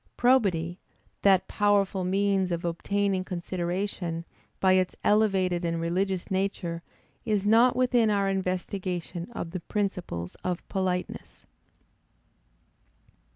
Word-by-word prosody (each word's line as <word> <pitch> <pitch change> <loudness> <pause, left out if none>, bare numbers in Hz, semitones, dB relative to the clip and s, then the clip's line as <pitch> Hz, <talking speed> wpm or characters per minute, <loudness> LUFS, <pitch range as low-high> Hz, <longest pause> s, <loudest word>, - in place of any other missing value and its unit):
Probity, 195 -9 +2 0.4
that 190 -2 +4
powerful 200 -2 +2
means 195 0 +1
of 170 0 -2
obtaining 195 +3 0
consideration, 175 -1 -3 0.3
by 190 -1 +4
its 185 -1 +2
elevated 190 -4 +2
and 165 -1 -1
religious 185 +3 -1
nature, 190 -3 -1 0.4
is 210 -3 0
not 230 +4 +5
within 245 -3 +3
our 200 -1 +2
investigation 185 -1 -3
of 170 -7 -5
the 185 - -3
principles 175 - -3
of 180 -1 -3
politeness. 185 -2 -3
190 Hz, 105 wpm, -27 LUFS, 175-200 Hz, 0.4 s, not